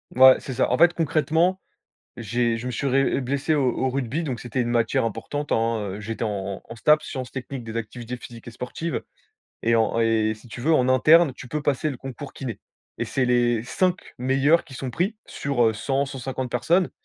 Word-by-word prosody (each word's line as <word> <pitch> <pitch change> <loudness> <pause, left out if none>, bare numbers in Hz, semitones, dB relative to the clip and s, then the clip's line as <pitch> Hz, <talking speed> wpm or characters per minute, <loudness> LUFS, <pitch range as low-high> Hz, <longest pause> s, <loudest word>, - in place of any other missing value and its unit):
Ouais, 130 0 +8
c'est 130 - -6
ça. 130 - +1
En - - +2
fait, 175 +1 +6
concrètement, 165 +3 +1 0.6
j'ai 120 +1 0
je 120 - -7
me 125 - -2
suis 140 +4 -2
ré 135 +1 +2
blessé 140 +4 0
au 135 -4 +2
au 130 - +1
rugby, 135 +4 -2
donc 130 -6 -3
c'était 125 +1 -2
une 120 - -1
matière 115 -1 +1
importante, 145 +7 -4
hein, 115 0 +2 0.2
heu, 105 - -6
j'étais 115 +2 -4
en 100 -2 -3
en - - -8
STAPS, 150 +6 +3
sciences 130 -3 -5
techniques 130 -1 -6
des 115 0 -5
activités 120 +2 -5
physiques 120 -1 -12
et 120 - -6
sportives 155 +8 -4 0.6
et 115 0 +3
en 115 0 +2
et 110 -1 +2
si 110 +3 -17
tu 120 - -9
veux, 160 +6 +2
en 130 -4 +3
interne, 150 +4 +6
tu 125 - -10
peux 150 +2 -3
passer 145 +2 0
le 130 - -6
concours 135 +2 -8
kiné 120 -6 -6 0.4
et - - -1
c'est 135 - 0
les 120 -2 +2
5 180 +8 +1 0.2
meilleurs 135 +6 +3
qui 140 -5 -12
sont 130 0 -4
pris 190 - -1
sur, 140 -4 0
heu, 110 - +3
100-150 135 +1 -2
personnes 170 +10 +2
130 Hz, 210 wpm, -24 LUFS, 115-145 Hz, 0.6 s, Ouais